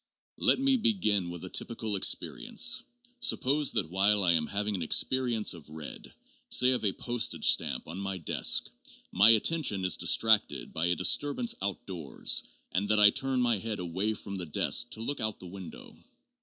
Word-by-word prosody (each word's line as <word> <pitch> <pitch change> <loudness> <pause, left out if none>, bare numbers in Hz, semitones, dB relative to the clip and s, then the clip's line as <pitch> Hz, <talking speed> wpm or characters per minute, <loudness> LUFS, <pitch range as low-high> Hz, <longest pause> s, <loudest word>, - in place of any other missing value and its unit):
Let - - +3
me 270 0 +2
begin 145 - +1
with 85 0 -8
a - - -7
typical 110 -3 -2
experience. - - +1 0.4
Suppose 145 - +1
that 80 - -1
while 100 +2 +2
I 90 - +3
am 80 -2 0
having 105 +1 -2
an 95 - -4
experience 120 +6 +1
of 80 -3 -13
red, 80 -1 -10 0.4
say 125 0 +4
of 125 - 0
a 100 - +3
postage 120 -1 0
stamp - - -1
on 85 +4 -7
my 95 -1 -4
desk, 80 - 0 0.4
my 100 +5 +6
attention 115 - +2
is 90 - +3
distracted 110 -2 +2
by 80 +2 -1
a 90 - +1
disturbance 145 - +1
outdoors 90 -6 -2 0.3
and 100 +2 -2
that 110 0 +3
I 105 -1 +7
turn 135 -2 -1
my 120 -4 +1
head 110 +1 -4
away 95 +5 -3
from 100 -1 -6
the 90 -2 -5
desk 120 +9 +1
to 110 - -8
look 140 +4 -3
out 110 -2 -2
of - - -34
the - - -8
window. 90 -1 -11
105 Hz, 180 wpm, -29 LUFS, 90-120 Hz, 0.4 s, I